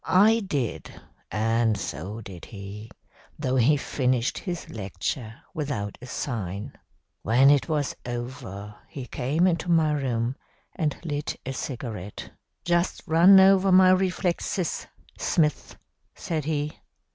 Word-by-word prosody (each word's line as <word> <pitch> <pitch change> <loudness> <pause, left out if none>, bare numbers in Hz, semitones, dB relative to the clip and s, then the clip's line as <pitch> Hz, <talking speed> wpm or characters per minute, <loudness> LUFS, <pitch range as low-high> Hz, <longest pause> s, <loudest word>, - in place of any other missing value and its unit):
I 215 +5 +5
did, 145 - -3 0.3
and 115 0 +1
so 100 - -5
did 95 -5 -10
he, 105 +1 -9 0.5
though 130 -3 0
he 135 +5 +4
finished 130 -3 0
his 175 -3 -5
lecture 110 - -4 0.2
without 135 - -3
a 125 - -9
sign. 105 -7 -4 0.5
"When 130 +6 +5
it 145 +3 +2
was 150 -3 0
over 120 -4 -6 0.2
he 135 -3 -7
came 145 +8 0
into 175 -1 +1
my 160 -3 +4
room 125 -3 -1 0.4
and 155 -5 -1
lit 145 -2 -3
a 135 - -3
cigarette. 115 -8 -6 0.3
"'Just 175 +1 +1
run 180 +4 +7
over 195 0 +6
my 185 0 +7
reflexes, 185 -1 0 0.3
Smith,' 150 -3 0 0.4
said 155 -4 -3
he. 150 -1 -1
135 Hz, 120 wpm, -26 LUFS, 115-165 Hz, 0.5 s, run